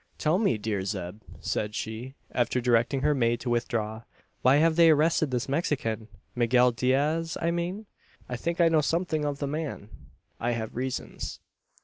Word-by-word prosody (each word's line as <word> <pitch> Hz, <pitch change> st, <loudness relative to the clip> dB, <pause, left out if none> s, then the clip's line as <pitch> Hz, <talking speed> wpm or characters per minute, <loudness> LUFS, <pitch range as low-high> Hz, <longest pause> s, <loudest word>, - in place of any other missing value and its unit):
"Tell 155 Hz, +5 st, +2 dB
me, 200 Hz, -, +2 dB
dear 105 Hz, -2 st, -2 dB
Zeb," 95 Hz, 0 st, -4 dB, 0.2 s
said 105 Hz, 0 st, -2 dB
she, 115 Hz, +5 st, -5 dB, 0.2 s
after 120 Hz, +1 st, +1 dB
directing 120 Hz, +2 st, +2 dB
her 150 Hz, +1 st, +3 dB
maid 120 Hz, -3 st, +1 dB
to 120 Hz, -, -2 dB
withdraw, 110 Hz, -2 st, -1 dB, 0.4 s
"why 130 Hz, +2 st, +5 dB
have 160 Hz, +2 st, +4 dB
they 165 Hz, 0 st, +7 dB
arrested 155 Hz, 0 st, +3 dB
this 125 Hz, -2 st, -1 dB
Mexican 135 Hz, -7 st, -1 dB, 0.3 s
Miguel 125 Hz, +1 st, +4 dB
Diaz 145 Hz, +7 st, +1 dB
I 170 Hz, 0 st, +1 dB
mean? 175 Hz, +5 st, -3 dB, 0.4 s
I 125 Hz, -, -3 dB
think 170 Hz, +8 st, -3 dB
I 170 Hz, -, +6 dB
know 160 Hz, -2 st, +4 dB
something 160 Hz, -1 st, 0 dB
of 145 Hz, -1 st, -1 dB
the 145 Hz, -, -2 dB
man. 145 Hz, -7 st, -4 dB, 0.5 s
I 120 Hz, +1 st, 0 dB
have 110 Hz, -2 st, -4 dB
reasons." 130 Hz, +1 st, -4 dB
130 Hz, 165 wpm, -27 LUFS, 115-155 Hz, 0.5 s, they